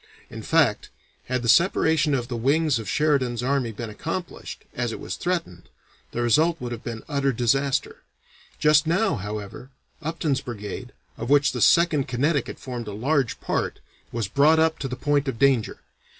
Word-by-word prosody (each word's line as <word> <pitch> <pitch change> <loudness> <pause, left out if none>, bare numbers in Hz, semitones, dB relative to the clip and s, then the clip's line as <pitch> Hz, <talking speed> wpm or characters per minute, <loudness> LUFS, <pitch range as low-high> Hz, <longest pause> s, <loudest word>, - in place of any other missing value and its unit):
In - - -7
fact, - - +2 0.4
had 125 -1 -2
the - - -2
separation 160 - +3
of 120 -3 -2
the 125 - -4
wings 140 +3 +2
of 110 - -6
Sheridan's 130 -6 +1
army 130 -3 0
been 110 +1 -6
accomplished, 165 - -6
as 120 -2 -2
it - - -6
was - - -5
threatened, 170 - -3 0.4
the 120 - -2
result 160 +8 +3
would 120 -1 -5
have 115 -2 -6
been 115 -2 -6
utter 140 -2 +1
disaster; 135 +3 0 0.6
just 150 0 +4
now, 190 +7 +2
however, 105 +4 -6 0.3
Upton's 155 -3 -1
brigade, 120 +1 -7 0.3
of 115 - -4
which 145 0 +4
the 125 - -4
Second 165 -3 +4
Connecticut 140 +3 0
formed 120 -4 -6
a 105 - -5
large 130 +2 0
part, - - -2 0.3
was 115 -4 -2
brought 150 +7 +4
up 160 0 +2
to 135 - -3
the 125 - -4
point 145 +2 0
of 130 - -2
danger. 130 -3 +2
135 Hz, 170 wpm, -24 LUFS, 120-150 Hz, 0.6 s, just